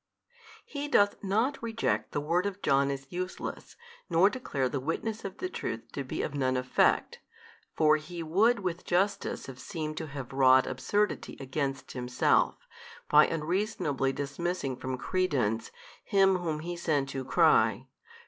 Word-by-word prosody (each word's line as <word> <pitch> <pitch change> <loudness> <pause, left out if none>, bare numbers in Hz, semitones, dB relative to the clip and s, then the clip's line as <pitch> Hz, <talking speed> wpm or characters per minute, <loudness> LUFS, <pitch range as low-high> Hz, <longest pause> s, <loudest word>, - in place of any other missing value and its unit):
He 285 0 -5
doth 205 -9 +3
not 225 +8 0
reject 230 -1 -1
the - - -1
word 170 +6 +1
of 200 -1 -5
John 140 0 +3
as 140 0 -4
useless, 185 +1 -5 0.3
nor 175 +4 +5
declare 140 - -2
the 135 +2 -2
witness 210 - -3
of 195 -1 -6
the 370 - -3
truth 115 - -5
to 140 - -4
be 130 - -3
of 145 - -3
none 130 -2 0
effect 130 0 +2 0.6
(for 155 -1 +5
He 170 +2 -7
would 205 +8 +3
with 180 -2 -3
justice 195 +3 0
have 130 -1 -10
seemed 155 +2 -5
to 160 - -4
have 135 -2 -7
wrought 130 -1 +6
|283 - - -4
absurdity 205 -2 -1
against 135 0 -3
Himself, 125 0 +2 0.5
by 150 0 +7
unreasonably 160 - -1
dismissing 140 +1 -3
from 130 0 -4
credence 130 - 0 0.3
him 195 -2 +4
whom 160 -4 -3
He 175 +2 -4
sent 150 -5 0
to 135 -1 -4
cry. - - +3
155 Hz, 155 wpm, -29 LUFS, 135-190 Hz, 0.6 s, by